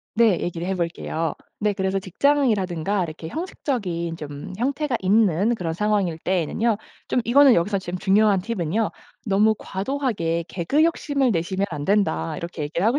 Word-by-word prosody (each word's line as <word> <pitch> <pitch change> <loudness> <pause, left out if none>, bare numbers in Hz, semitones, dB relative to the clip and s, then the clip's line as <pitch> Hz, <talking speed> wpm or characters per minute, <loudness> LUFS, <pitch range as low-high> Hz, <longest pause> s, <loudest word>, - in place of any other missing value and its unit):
네 225 -5 +4
얘기를 175 0 -3
해 190 - 0
볼게요. 165 -2 -2 0.3
네 210 -1 +1
그래서 190 0 -1
직장이라든가 200 - +1
이렇게 160 0 -7
형식적인 190 - -3
좀 145 +3 -7
형태가 270 0 0
있는 200 +2 +3
그런 170 -6 -3
상황일 195 -3 0
때에는요. 190 +6 0 0.3
좀 250 - +2
이거는 270 +2 +6
여기서 195 +4 +1
중요한 190 +2 +2
팁은요. 210 0 -1 0.3
"너무 210 +1 +3
과도하게 195 -7 -2
개그 270 - +1
욕심을 285 -6 +1
내시면 190 +2 0
안 145 -2 -5
된다." 190 - +1
이렇게 170 -2 -5
얘기를 170 +7 -1
하고 255 +5 +3
195 Hz, 360 characters per minute, -23 LUFS, 170-230 Hz, 0.3 s, 이거는